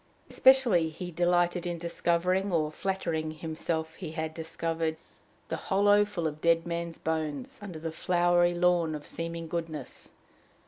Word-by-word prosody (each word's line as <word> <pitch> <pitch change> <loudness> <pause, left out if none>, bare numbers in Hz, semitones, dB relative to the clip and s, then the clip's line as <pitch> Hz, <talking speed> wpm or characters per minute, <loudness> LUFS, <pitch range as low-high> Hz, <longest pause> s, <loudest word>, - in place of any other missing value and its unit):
Especially 245 -11 +5
he 175 +3 -7
delighted 175 +1 +1
in 175 -1 -2
discovering, 175 +3 0
or 155 -3 +1
flattering 165 -3 -2
himself 160 0 -3
he 165 -4 -6
had 160 -1 -3
discovered, 160 0 -2 0.5
the - - -3
hollow 205 +1 +4
full 195 -5 -4
of 155 -1 -3
dead 165 0 +3
men's 170 -1 -3
bones 160 - -3
under 190 -5 -7
the 160 +1 -4
flowery 175 +1 +2
lawn 175 -2 +2
of 150 - -8
seeming 165 0 -5
goodness. 165 -2 -5
170 Hz, 140 wpm, -29 LUFS, 160-180 Hz, 0.5 s, Especially